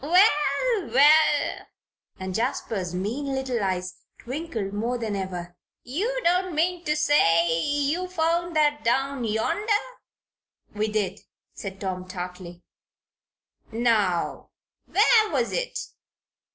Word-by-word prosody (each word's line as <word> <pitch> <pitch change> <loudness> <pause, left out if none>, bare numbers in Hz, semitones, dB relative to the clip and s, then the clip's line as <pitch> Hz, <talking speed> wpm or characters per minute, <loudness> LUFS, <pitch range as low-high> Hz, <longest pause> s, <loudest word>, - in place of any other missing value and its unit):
"Well! 360 - +3
Well!" 295 +3 +4 0.5
and 190 0 -4
Jasper's 205 -5 -2
mean 225 +10 -3
little 260 -4 -2
eyes 185 -1 -2 0.2
twinkled 245 -7 -5
more 230 +4 -1
than 220 -3 -3
ever. 180 -2 -5 0.3
"You 425 - -2
don't 360 0 +1
mean 350 +2 0
to 300 - +1
say 170 - +3
you 290 - 0
found 340 -1 0
that 295 -1 +2
down 270 +2 0
yonder?" 225 - -1 1.0
"We 210 +1 -1
did," 205 -3 -2 0.3
said 195 -1 -7
Tom, 185 -2 -4
tartly. 180 -1 -7 1.1
"Now, 220 -6 0 0.4
where 435 +1 +4
was 250 -6 0
it?" - - -2
250 Hz, 110 wpm, -25 LUFS, 195-320 Hz, 1.1 s, Well